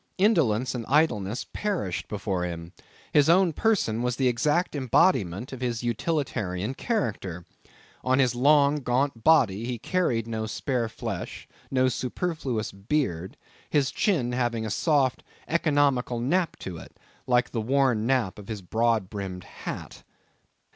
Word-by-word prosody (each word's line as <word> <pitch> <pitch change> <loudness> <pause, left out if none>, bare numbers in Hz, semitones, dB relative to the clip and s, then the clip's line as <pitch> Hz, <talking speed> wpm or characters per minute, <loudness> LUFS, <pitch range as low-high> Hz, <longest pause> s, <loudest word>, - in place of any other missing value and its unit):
Indolence 135 - +2
and 120 -2 -3
idleness 125 -8 +1
perished 185 - -2
before 100 -3 -2
him. 85 -1 -5 0.4
His 145 0 +5
own 175 -1 +5
person 160 - +1
was 125 0 0
the 130 0 +1
exact 150 +9 +1
embodiment 125 - +2
of 130 - -7
his 120 -2 -2
utilitarian 120 - -1
character. 105 - -2 0.6
On 130 0 +2
his 130 -3 +3
long, 140 +3 +4
gaunt 130 -3 -1
body, 115 -10 +4
he 125 0 -3
carried 120 -4 0
no 110 -1 -3
spare 120 0 -1
flesh, - - -6 0.2
no 130 -1 +2
superfluous 130 - -2
beard, 95 - -2 0.3
his 140 -3 +2
chin 155 - +1
having 120 -2 -1
a 110 - -3
soft, 135 -1 +1 0.2
economical 145 -7 +2
nap 165 +8 +1
to 90 -3 -7
it, 80 - -13 0.3
like 125 -1 +2
the 115 - -1
worn 125 -2 +2
nap 125 -8 +1
of 100 - -11
his 105 -4 -5
broad 110 +1 +1
brimmed 95 -3 -6
hat. - - -8
125 Hz, 140 wpm, -26 LUFS, 110-145 Hz, 0.6 s, His